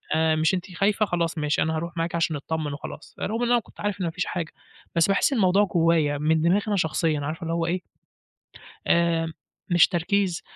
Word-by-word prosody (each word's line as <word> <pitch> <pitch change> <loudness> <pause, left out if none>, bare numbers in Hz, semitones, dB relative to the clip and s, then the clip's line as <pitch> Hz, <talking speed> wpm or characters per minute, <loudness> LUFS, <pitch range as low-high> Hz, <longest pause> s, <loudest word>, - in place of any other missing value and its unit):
آآ، 160 0 +3
مش 155 +3 +2
أنتِ 185 +1 -3
خايفة 205 +3 +2
خلاص 170 -3 -1
ماشي 150 -1 0
أنا 160 0 0
هاروح 170 +2 -5
معاكِ 165 +1 -1
عشان 165 -1 0
نتطمن 150 0 -3
وخلاص، 145 +1 -9
رغم 225 +3 -2
إن 240 - +1
أنا 240 - +5
كنت 225 - -18
عارف 205 -1 -2
إن - - 0
ما 165 - -1
فيش 180 +2 -2
حاجة. 170 -3 -4 0.4
بس 165 -1 +4
باحس 200 +7 +2
إن - - 0
الموضوع 195 0 +4
جوايّا 165 -5 +2
من 155 +2 +1
دماغي 175 +5 +3
أنا 210 - +1
شخصيًا، 160 -3 0
عارفة 155 +5 -4
اللي 165 0 -2
هو 165 0 0
إيه 175 +2 -1 1.1
آآ، 165 -1 +2 0.4
مش 175 -1 +6
تركيز 180 +1 0
170 Hz, 210 wpm, -25 LUFS, 160-185 Hz, 1.1 s, مش